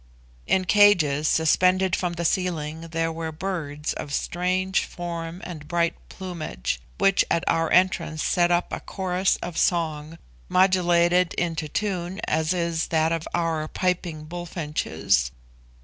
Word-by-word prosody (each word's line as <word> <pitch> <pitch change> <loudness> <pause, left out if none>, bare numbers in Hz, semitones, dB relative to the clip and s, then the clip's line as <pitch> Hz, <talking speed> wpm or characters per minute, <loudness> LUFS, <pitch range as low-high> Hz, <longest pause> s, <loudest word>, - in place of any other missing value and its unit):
In 185 -1 +2
cages 170 -7 +4
suspended 185 +4 +3
from 175 -2 -2
the 170 0 -3
ceiling 165 -3 -1
there 165 0 -1
were 160 0 -4
birds 155 -4 -3
of 145 - -6
strange 185 +2 0
form 170 0 -6
and 155 -5 -8
bright 170 0 +1 0.2
plumage, 155 - -4 0.2
which 195 0 +4
at 170 - +1
our 165 -1 +1
entrance 175 -3 +2
set 175 -1 +2
up 175 0 +1
a - - -2
chorus 185 0 0
of 175 - -4
song, 160 -2 0 0.3
modulated 180 -1 +3
into 165 -3 -1
tune 190 -1 -2
as 160 +1 +1
is 170 -2 0
that 160 0 +1
of 165 -1 -2
our 165 -2 -1
piping 175 -3 -2
bullfinches. 150 - -1
170 Hz, 135 wpm, -25 LUFS, 160-180 Hz, 0.3 s, cages